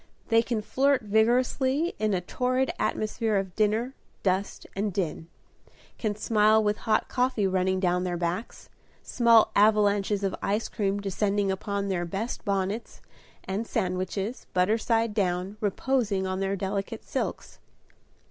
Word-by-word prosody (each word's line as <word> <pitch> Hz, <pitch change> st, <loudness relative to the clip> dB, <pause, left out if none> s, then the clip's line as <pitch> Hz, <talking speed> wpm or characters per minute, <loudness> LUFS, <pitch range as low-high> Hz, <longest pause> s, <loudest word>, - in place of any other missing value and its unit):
They 225 Hz, 0 st, +5 dB
can 230 Hz, -2 st, -2 dB
flirt 270 Hz, +2 st, +2 dB
vigorously 255 Hz, -, +2 dB
in 215 Hz, -2 st, +1 dB
a 180 Hz, -, -1 dB
torrid 255 Hz, +7 st, 0 dB
atmosphere 215 Hz, 0 st, -1 dB
of 190 Hz, -2 st, -3 dB
dinner, 220 Hz, +4 st, +1 dB, 0.3 s
dust, 190 Hz, +1 st, -1 dB
and 205 Hz, +1 st, -1 dB
din; 165 Hz, -4 st, -3 dB, 0.7 s
can 215 Hz, -2 st, -1 dB
smile 215 Hz, 0 st, +3 dB
with 210 Hz, 0 st, +1 dB
hot 215 Hz, -, +3 dB
coffee 250 Hz, -5 st, 0 dB
running 185 Hz, 0 st, +1 dB
down 180 Hz, -1 st, +1 dB
their 175 Hz, -1 st, -2 dB
backs, 175 Hz, +6 st, -4 dB, 0.4 s
small 230 Hz, -2 st, +4 dB
avalanches 205 Hz, -1 st, +3 dB
of 195 Hz, -1 st, 0 dB
ice 210 Hz, +3 st, -1 dB
cream 200 Hz, -1 st, -1 dB
descending 200 Hz, 0 st, 0 dB
upon 200 Hz, +1 st, -2 dB
their 185 Hz, -3 st, -1 dB
best 200 Hz, +7 st, -4 dB
bonnets, 200 Hz, +3 st, -2 dB, 0.4 s
and 205 Hz, +4 st, -3 dB
sandwiches, 185 Hz, +5 st, -2 dB
butter 190 Hz, +5 st, +3 dB
side 225 Hz, -1 st, +1 dB
down, 190 Hz, 0 st, -1 dB
reposing 210 Hz, -2 st, 0 dB
on 185 Hz, 0 st, -2 dB
their 195 Hz, 0 st, 0 dB
delicate 195 Hz, +1 st, -3 dB
silks. -, -, -4 dB
205 Hz, 140 wpm, -27 LUFS, 190-225 Hz, 0.7 s, They